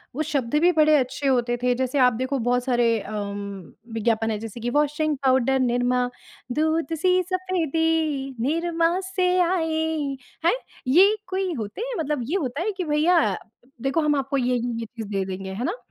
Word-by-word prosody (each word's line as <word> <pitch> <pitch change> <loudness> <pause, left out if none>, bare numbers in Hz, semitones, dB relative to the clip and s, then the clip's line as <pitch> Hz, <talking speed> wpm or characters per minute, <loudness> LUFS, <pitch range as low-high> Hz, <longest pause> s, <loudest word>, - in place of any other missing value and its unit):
वो 310 - -1
शब्द 280 -4 -1
भी 355 +1 +5
बड़े 310 -2 +4
अच्छे 265 +2 -1
होते 240 -2 +2
थे। 250 0 +3
जैसे 260 +2 -1
आप 250 -2 +5
देखो 260 +3 -2
बहुत 245 +1 +1
सारे 240 -3 +2
अम, 200 -3 -6 0.2
विज्ञापन 225 0 +1
है 215 - -1
जैसे 225 +1 -7
कि 240 - -1
वाशिंग 295 +2 +1
पाउडर 265 0 +3
निरमा, 245 0 +1 0.4
दूध 315 +2 0
सी 365 +3 +3
सफेदी 320 -6 0
निरमा 335 +5 +1 0.2
से 365 -1 +2
आए 325 -3 +1 0.6
हैं, 345 - +4 0.3
ये 380 +10 +6
कोई 375 0 -1
होते 220 - -5
हैं - - -4
मतलब 300 -3 -1
ये 355 - 0
होता 270 +2 -3
है 425 +5 0
कि 365 - -1
भैया 305 - +2 0.4
देखो 275 +5 +1
हम 300 -1 +2
आपको 275 0 -1
ये 250 -1 +1
ये - - 0 0.2
ये 230 - -4
चीज़ 225 -1 -8
दे 195 -2 -1
देंगे, 190 0 -5
है 215 +5 -4
ना? 370 - -2
275 Hz, 180 wpm, -24 LUFS, 240-325 Hz, 0.6 s, ये